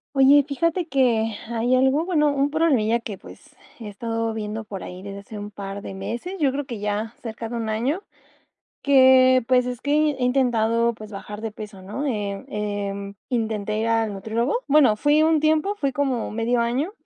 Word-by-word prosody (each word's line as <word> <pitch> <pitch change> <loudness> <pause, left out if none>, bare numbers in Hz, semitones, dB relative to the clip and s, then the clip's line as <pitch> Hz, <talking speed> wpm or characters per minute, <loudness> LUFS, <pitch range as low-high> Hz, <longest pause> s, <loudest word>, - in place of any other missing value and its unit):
Oye, 275 +2 +7
fíjate 335 +5 -1
que 230 -6 +1
hay 235 +2 +1
algo 265 +4 +3
bueno, 315 -4 +2
un 280 0 +1
problemilla 270 -8 +2
que, 215 -4 -7
pues, - - -15 0.2
he 225 - -7
estado 225 +2 -3
viendo 220 0 -4
por 200 -3 -7
ahí 180 +1 -8
desde 200 0 -7
hace 205 +2 -10
un 205 0 -7
par 200 0 -7
de - - -7
meses, 240 - -5
yo 280 -4 +3
creo 285 +1 -3
que 235 -4 -6
ya, 210 +2 -2
cerca 225 -1 -6
de 240 - -6
un 225 -2 -3
año. 250 - -1 0.8
Que, 260 -2 +6
pues, 250 -1 +3
es 250 -1 -5
que 285 - -2 0.2
he 265 -3 -4
intentado, 235 -2 +2
pues, 215 -1 -11
bajar 210 +1 -8
de 225 -1 -4
peso, 210 -2 -10
¿no? 210 +10 -5
Eh, 205 -6 -3
em, 200 -1 -4
intenté 220 -3 -1
ir 225 - 0
al 225 -2 +1
nutriólogo 220 - -1
bueno, 280 -7 +5
fui 295 +5 +3
un 320 0 +3
tiempo, 310 +5 +2
fui 280 -7 0
como 265 -3 -1
medio 230 +2 0
año, 255 +10 -1
235 Hz, 190 wpm, -23 LUFS, 210-275 Hz, 0.8 s, Oye